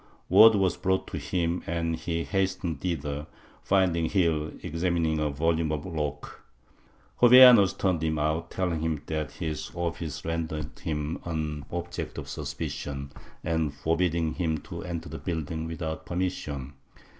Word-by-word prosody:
Word 110 0 +8
was 95 -3 +2
brought 95 0 0
to - - -4
him 85 -1 -1
and 85 0 -1
he 85 +1 -2
hastened 95 -6 -1
thither, 75 -4 -3 0.3
finding 90 -4 +2
Gil 80 -5 +1
examining 80 -1 0
a 75 -1 +1
volume 80 +2 0
of 75 -1 -3
Locke. 75 -4 -4 0.8
Jovellanos 125 -5 +9
turned 90 -4 +1
him 80 -1 0
out, 80 +2 -1
telling 90 -4 -1
him 80 -2 -2
that 75 -2 -3
his 80 -2 -4
office 85 -2 -4
rendered 80 -2 -3
him 75 -1 -3
an 75 -3 -3
object 85 0 -5
of - - -6
suspicion 70 -1 -5 0.3
and 80 -3 0
forbidding 80 +1 0
him 80 -3 -1
to - - -7
enter 85 -2 -5
the - - -7
building 80 -1 -3
without 80 -1 -5
permission. 85 -7 -3
80 Hz, 140 wpm, -27 LUFS, 75-85 Hz, 0.8 s, Jovellanos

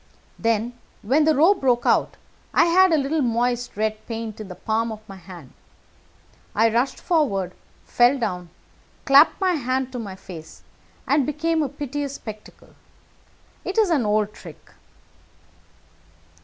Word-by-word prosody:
"Then, 230 +1 0 0.3
when 280 +8 +3
the 315 -1 +3
row 330 +8 +6
broke 250 -10 0
out, - - +2 0.4
I - - +6
had 370 +2 +5
a 320 - +4
little 295 +2 0
moist 245 -1 -1
red 215 0 -1
paint 225 -2 -5
in 215 - -8
the 180 - -9
palm 225 +4 -1
of 215 0 -10
my 195 - -10
hand. 175 -7 -13 1.0
I 225 +2 +4
rushed 245 +4 0
forward, 200 - 0 0.3
fell 245 +3 +3
down, 180 -8 -3 0.6
clapped 280 +3 +6
my 375 -1 +2
hand 260 -3 -1
to 250 - -5
my 200 -4 -6
face, 170 -4 -12 0.4
and 285 0 +3
became 315 +3 0
a 290 - -1
piteous 285 -1 -4
spectacle. 215 -4 -11 0.9
It 380 - -5
is 425 -5 +3
an 290 -7 +2
old 210 0 +1
trick." 165 -7 -13
240 Hz, 145 wpm, -23 LUFS, 215-290 Hz, 1.0 s, row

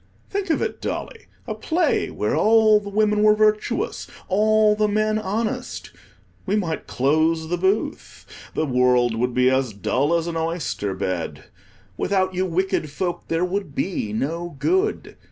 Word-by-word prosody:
Think 400 -1 -2
of 320 - +1
it, - - -4
Dolly, 455 - -5 0.2
a - - -3
play 340 +2 0
where - - -1
all 220 -1 +5
the 205 -1 -8
women 210 0 +2
were 215 0 +6
virtuous, 215 0 0 0.2
all 215 +2 +4
the 210 0 +2
men 215 +1 +1
honest! 225 +5 -3 0.6
We 195 - +1
might 175 -6 -2
close 160 +4 +1
the 175 - 0
booth; 190 +4 -2 0.3
the 155 - +1
world 125 -2 +3
would 125 +2 -1
be 125 0 +4
as 130 -4 0
dull 135 - 0
as 165 - -2
an 170 -1 -3
oyster 160 - -2
bed. 95 -3 -3 0.5
Without 190 -1 0
you 185 +1 0
wicked 180 -3 -1
folk 175 +5 -4
there 165 +2 0
would 185 -5 -4
be 175 - -2
no 165 +9 -3
good. 380 - 0
185 Hz, 155 wpm, -22 LUFS, 145-215 Hz, 0.6 s, were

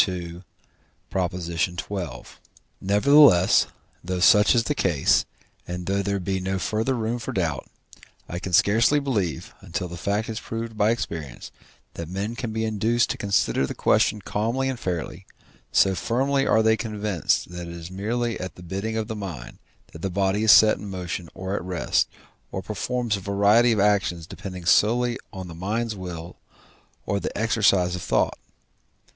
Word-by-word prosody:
xii. 90 -2 -5 0.7
Nevertheless, 90 - +1 0.4
though 90 +1 -3
such 105 +5 +6
is 115 - +3
the 150 - 0
case, 85 - +2 0.4
and 90 0 -5
though 100 +2 0
there 100 0 -1
be 95 +1 -2
no 95 +1 -2
further 110 +7 -1
room 115 +1 -2
for 115 - -5
doubt, 80 -7 -2 0.6
I 85 - -5
can 95 - -6
scarcely 115 - +4
believe, 105 - -2
until 90 +2 -4
the 85 0 -8
fact 100 +5 -1
is 110 0 -4
proved 115 0 -5
by 105 0 +2
experience, 80 - -4 0.4
that 85 -1 -7
men 100 +5 -3
can 120 -2 -4
be 110 0 -1
induced 110 +2 +1
to - - -4
consider 100 -9 +1
the - - -6
question 105 - +2
calmly 115 +7 -1
and 130 -3 -4
fairly, 90 -4 -4 0.4
so 95 - +4
firmly 135 +8 0
are 110 - +4
they 110 0 +4
convinced 105 -6 -1
that 90 -1 -6
it 85 - -7
is 85 +1 -9
merely 115 +5 -2
at 90 0 -6
the 90 - -12
bidding 100 +6 -3
of 110 -1 -2
the 110 - -4
mind, 90 - -7 0.3
that 80 - -10
the 95 - -2
body 100 +3 0
is 110 - +7
set 110 -1 +7
in 105 - -7
motion 90 -2 -5
or 95 +1 -4
at 100 - -2
rest, 90 -1 0 0.4
or 95 - -4
performs 115 +1 -2
a - - -6
variety 100 +5 +3
of 110 - +1
actions 100 -5 +1
depending 90 -1 -8
solely 120 +6 +3
on 95 -1 -7
the 85 - -9
mind's 110 +6 -2
will 90 -3 -7 0.7
or 100 - 0
the - - -5
exercise 100 -5 +2
of 90 - -6
thought. - - 0
100 Hz, 165 wpm, -24 LUFS, 90-110 Hz, 0.7 s, is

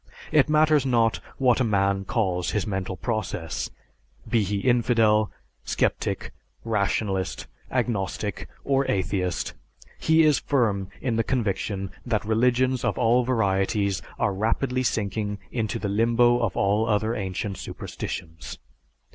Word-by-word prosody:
It 150 -1 +4
matters 155 -1 +4
not 115 -4 +2 0.2
what 130 -2 +3
a - - +3
man 100 -3 +1
calls 90 -5 0
his 105 - -1
mental 95 -3 -3
process; 105 -8 -3 0.6
be 115 - +2
he 100 0 -1
infidel, 115 -3 +3 0.3
sceptic, - - -1 0.3
rationalist, 100 -3 -1 0.2
agnostic, 100 -2 -2
or 135 -1 +1
atheist; 90 -2 -1 0.5
he 160 0 +4
is 150 -2 +4
firm 110 -9 +1
in 120 -4 0
the 115 - +2
conviction 100 -5 -2
that 110 -4 -1
religions 125 +3 +2
of - - 0
all 120 +1 +3
varieties 100 -4 +1 0.2
are 100 - +1
rapidly 120 +6 0
sinking 105 -3 -1
into 115 -3 -1
the 105 - -3
limbo 120 +4 +3
of 115 - -1
all 105 +3 +2
other 110 +2 +1
ancient 95 -1 -3
superstitions. 80 -1 -6
110 Hz, 125 wpm, -25 LUFS, 100-120 Hz, 0.6 s, It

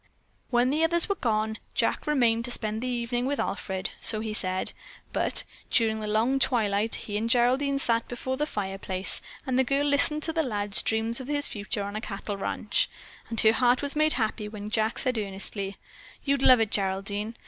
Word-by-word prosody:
When 245 +1 +3
the 310 +3 +1
others 340 +1 +3
were 400 - +1
gone, 220 - -1 0.2
Jack - - +1
remained 235 -6 +2
to 245 - -2
spend 220 -1 -3
the 255 - -2
evening 240 0 -1
with 285 +1 -1
Alfred, 190 -1 -2
so 215 - +1
he 215 0 -3
said, 185 -3 +1 0.4
but - - +1 0.3
during 220 -2 +3
the 215 - -4
long 225 +6 +2
twilight 220 -4 +2
he 205 -1 -4
and 225 +2 -1
Geraldine 260 +3 +3
sat 230 -4 +1
before 260 +2 -3
the 300 +3 -1
fireplace 195 -4 -3 0.2
and 260 -2 +1
the - - +5
girl 275 +3 +1
listened 290 +1 +3
to 320 - -2
the 325 - +2
lad's 205 -7 -1
dreams 225 +2 +1
of 260 - -7
his 290 0 +1
future 205 -1 -3
on 200 +1 -5
a 215 - -3
cattle 205 -1 -5
ranch, 200 +1 0 0.4
and 230 - -2
her 220 0 +6
heart 250 +2 +3
was 285 +1 -1
made 310 +1 +3
happy 220 -2 -1
when 210 0 -7
Jack 220 +1 +1
said 250 -3 +1
earnestly, 195 0 -4 0.5
"You'd 280 -1 +1
love 255 -2 +7
it, 220 -2 +1
Geraldine. 200 +3 -1
230 Hz, 195 wpm, -27 LUFS, 210-260 Hz, 0.5 s, love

